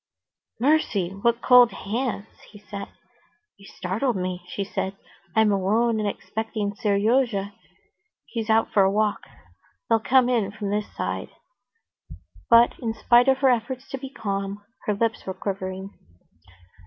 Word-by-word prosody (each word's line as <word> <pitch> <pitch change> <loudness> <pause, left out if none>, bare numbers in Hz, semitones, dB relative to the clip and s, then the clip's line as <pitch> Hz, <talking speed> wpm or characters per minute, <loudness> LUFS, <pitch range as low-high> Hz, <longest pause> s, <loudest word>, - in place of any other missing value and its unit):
"Mercy! 240 - +2
what 235 +4 0
cold 250 -2 +7
hands!" 220 0 -4
he 210 - -14
said. 200 -1 -8 0.7
"You 200 -1 -15
startled 215 +7 -2
me," 180 -1 -3
she 200 - -3
said. 195 0 -4 0.4
"I'm 220 -1 +4
alone, 215 +4 +1
and 210 -1 0
expecting 215 -1 -4
Seryozha; 205 0 +1 0.7
he's 225 -2 -5
out 220 +1 +2
for 200 - +5
a 190 - +4
walk; 210 +1 0 0.7
they'll 225 -1 +4
come 255 +2 +4
in 230 -6 +1
from 205 -2 -4
this 210 0 -2
side." - - -3 1.2
But, 235 0 +5
in 225 -3 -3
spite 240 +3 +4
of 265 -1 +4
her - - +7
efforts 250 +3 -2
to 270 - -4
be 270 0 -7
calm, 200 -4 -4 0.2
her 210 - +1
lips 225 0 -1
were 190 - -3
quivering. 190 0 -5
215 Hz, 140 wpm, -24 LUFS, 200-235 Hz, 1.2 s, cold